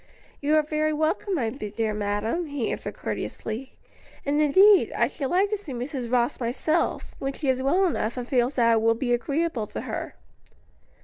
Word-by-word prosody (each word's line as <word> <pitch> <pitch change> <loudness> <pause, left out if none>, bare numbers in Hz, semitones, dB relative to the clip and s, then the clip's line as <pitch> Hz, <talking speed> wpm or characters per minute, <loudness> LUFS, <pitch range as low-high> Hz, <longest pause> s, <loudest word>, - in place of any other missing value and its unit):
"You 295 +2 +2
are 310 - +4
very 305 +1 0
welcome, 320 +6 0
my 235 -8 0
dear 220 -3 -3
madam," 210 +10 -1
he 285 -6 -2
answered - - -5
courteously; 230 +5 -5 0.5
"and, 290 +2 +2
indeed, 380 +7 +6
I - - +3
should 275 -3 -4
like 390 +3 +2
to 425 - +1
see 310 -9 -8
Mrs. 245 -1 -4
Rose 245 -1 +1
myself, 265 +7 -1
when 270 0 -2
she 275 -1 -2
is 260 0 +1
well 350 +9 +3
enough 240 -9 -1
and 245 -1 -4
feels 255 0 +1
that 230 -2 +4
it 225 - +3
will 225 +1 +3
be 245 +1 0
agreeable 280 -2 -1
to - - -5
her." - - -5
270 Hz, 185 wpm, -25 LUFS, 235-310 Hz, 0.5 s, indeed